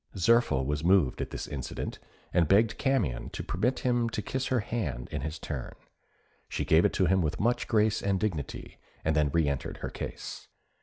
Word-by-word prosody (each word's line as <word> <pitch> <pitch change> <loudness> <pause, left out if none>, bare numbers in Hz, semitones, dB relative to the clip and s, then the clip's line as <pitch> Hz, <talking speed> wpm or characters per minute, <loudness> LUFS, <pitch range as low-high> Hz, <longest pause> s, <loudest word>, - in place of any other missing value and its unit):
Zirphil 90 - +3
was 75 +2 -1
moved 90 -7 +3
at - - -3
this - - -5
incident, 70 -4 -5 0.3
and 85 -2 +4
begged 105 +6 +3
Camion 120 - 0
to - - -5
permit 120 +9 0
him 120 -2 +1
to 110 -2 -3
kiss 130 0 -2
her 130 -3 +1
hand 85 - -3
in 75 - -3
his 75 +3 -4
turn: 70 -5 -5 0.7
she - - -2
gave 80 +1 +5
it - - +1
him 95 0 +3
with 75 -2 -1
much 120 +5 +1
grace 110 -1 +2
and 100 -1 +1
dignity, 85 -10 -4 0.3
and 80 0 +2
then 75 -2 +3
re 80 0 +2
entered 70 -1 -2
her - - -5
case. - - -6
90 Hz, 190 wpm, -29 LUFS, 75-115 Hz, 0.7 s, gave